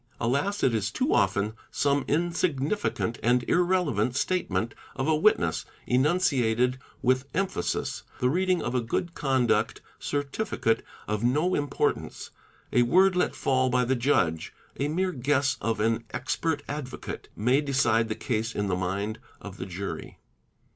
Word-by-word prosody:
Alas, 140 - 0
it 125 - +4
is 110 -1 0
too - - 0
often 100 +2 +2 0.2
some 140 -1 +1
insignificant 165 - 0
and 120 +1 +3
irrelevant 175 - +2
statement 120 - 0 0.2
of 130 +2 -2
a 160 - +4
witness, 150 - +2 0.2
enunciated 125 -4 +2 0.2
with 130 +1 +2
emphasis; 195 0 -1 0.2
the 125 - +2
reading 180 +5 +1
of 120 - -2
a 125 - +1
good 165 +9 -2
conduct 130 -6 +1 0.2
ce - - -6 0.2
tificate 115 - 0 0.3
of 105 +1 -2
no 150 +9 +2
importance, 145 -1 -1 0.4
a 125 - +5
word 185 +9 +4
let 180 - +1
fall 130 -1 +1
by 125 0 +2
the 130 +2 +1
judge, 90 - +1 0.3
a 140 - +1
mere 185 +5 0
guess 140 -1 +1
of 115 0 -1
ar 110 +1 +2
expert 160 -3 -2
advocate, 145 -3 -6
may 125 +6 +2
decide 120 -6 +2
the 110 - -1
case 115 -3 -2
in 105 -1 -1
the 90 - +1
mind 100 +4 -2 0.2
of 100 -1 -9
the 95 - -5
jury. 95 +2 -6
130 Hz, 145 wpm, -27 LUFS, 115-155 Hz, 0.4 s, a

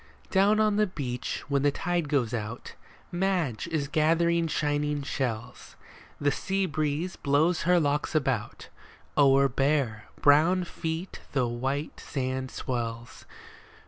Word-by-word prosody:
Down 205 +2 +4
on 215 -1 +3
the 210 0 +3
beach, 130 -9 -4
when 140 -1 +1
the 145 - +4
tide 170 +1 -1
goes 125 -6 +1
out, 115 +1 -5 0.4
Madge 175 - 0
is 155 -4 -1
gathering 165 +2 +2
shining 145 -1 -1
shells; 125 -5 -4 0.4
The 145 0 +2
sea 195 +6 -1
breeze 155 +2 -2
blows 155 +5 +2
her 180 -1 +6
locks 150 0 0
about; 135 -7 -1 0.5
O'er 140 -1 +5
bare, 135 -5 0
brown 160 +6 +5
feet 165 +1 -5
the 130 -3 +2
white 135 +5 -3
sand 130 -1 -3
swells. 115 -2 -5
145 Hz, 125 wpm, -28 LUFS, 130-170 Hz, 0.5 s, her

